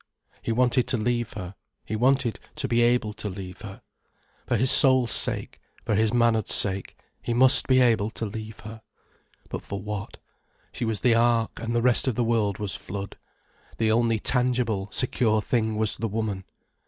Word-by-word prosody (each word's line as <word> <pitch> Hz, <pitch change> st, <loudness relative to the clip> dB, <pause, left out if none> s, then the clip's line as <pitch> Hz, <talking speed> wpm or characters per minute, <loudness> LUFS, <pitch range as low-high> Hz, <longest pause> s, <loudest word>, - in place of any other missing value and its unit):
He -, -, -2 dB
wanted 125 Hz, +1 st, +2 dB
to 125 Hz, -1 st, 0 dB
leave 120 Hz, +1 st, -1 dB
her, 95 Hz, -2 st, -7 dB, 0.3 s
he 110 Hz, -, -4 dB
wanted 130 Hz, +1 st, +1 dB, 0.2 s
to 135 Hz, -, -2 dB
be 120 Hz, -1 st, +2 dB
able 120 Hz, -3 st, +2 dB
to 105 Hz, 0 st, -6 dB
leave 90 Hz, -1 st, -8 dB
her. 100 Hz, -2 st, -10 dB, 0.6 s
For 120 Hz, -, +1 dB
his 130 Hz, +4 st, +4 dB
soul's 130 Hz, -4 st, +5 dB
sake, -, -, -1 dB, 0.2 s
for -, -, 0 dB
his 110 Hz, +1 st, +2 dB
manhood's 115 Hz, -3 st, +2 dB
sake, 95 Hz, -1 st, -1 dB, 0.2 s
he 120 Hz, -, -2 dB
must 130 Hz, +2 st, +5 dB
be 130 Hz, -1 st, +4 dB
able 115 Hz, -4 st, +3 dB
to 115 Hz, 0 st, -5 dB
leave 110 Hz, +1 st, -7 dB
her. 110 Hz, +1 st, -10 dB, 0.7 s
But -, -, -4 dB
for 100 Hz, -, -6 dB
what? 105 Hz, 0 st, -6 dB, 0.5 s
She -, -, -4 dB
was 110 Hz, -2 st, -2 dB
the 125 Hz, -, +4 dB
ark, 115 Hz, -1 st, +1 dB
and 115 Hz, +1 st, -3 dB
the 120 Hz, -, +1 dB
rest 125 Hz, +1 st, +3 dB
of 130 Hz, -, 0 dB
the 120 Hz, -, +1 dB
world 110 Hz, -4 st, 0 dB
was 105 Hz, -2 st, -3 dB
flood. 100 Hz, +1 st, -7 dB, 0.6 s
The 110 Hz, -1 st, +1 dB
only 115 Hz, 0 st, +2 dB
tangible, 120 Hz, -5 st, 0 dB
secure 115 Hz, -4 st, +1 dB
thing 110 Hz, 0 st, -1 dB
was 110 Hz, -1 st, 0 dB
the 115 Hz, -, -2 dB
woman. 105 Hz, -3 st, -3 dB
115 Hz, 180 wpm, -25 LUFS, 105-120 Hz, 0.7 s, soul's